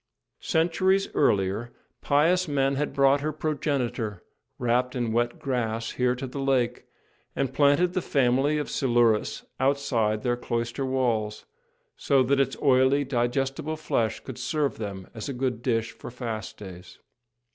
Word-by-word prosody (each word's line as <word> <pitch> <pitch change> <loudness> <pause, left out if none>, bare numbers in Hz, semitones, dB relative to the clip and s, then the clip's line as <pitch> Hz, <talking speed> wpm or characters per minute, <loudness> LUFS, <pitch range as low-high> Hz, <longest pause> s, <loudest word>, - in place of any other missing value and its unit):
Centuries 185 +4 +1
earlier, 105 -2 +1 0.3
pious 170 +6 +3
men 140 -2 +1
had 145 +2 -1
brought 140 0 +3
her 155 +1 -1
progenitor, 135 - -2 0.3
wrapped 125 +1 0
in 120 -3 -1
wet 120 +6 0
grass, 120 -6 -2
here 125 0 +1
to 130 - -5
the 130 +2 -6
lake, 130 -3 0 0.5
and 135 -2 -1
planted 145 +6 +3
the 185 - 0
family 135 +1 +2
of 150 - -2
Silurus 120 -4 +1
outside 130 -6 +1
their 120 -1 +1
cloister 120 +2 -2
walls, 115 -5 -1 0.5
so 135 -2 +3
that 135 +2 +2
its 135 -1 +1
oily, 135 +1 +4
digestible 135 +4 -1
flesh 115 -8 -1
could 130 - -8
serve 150 -6 -1
them 100 -3 -6
as 110 +3 -6
a - - -2
good 125 -2 -2
dish 115 -2 0
for - - -10
fast 115 -4 -5
days. 90 -3 -11
130 Hz, 145 wpm, -26 LUFS, 115-140 Hz, 0.5 s, oily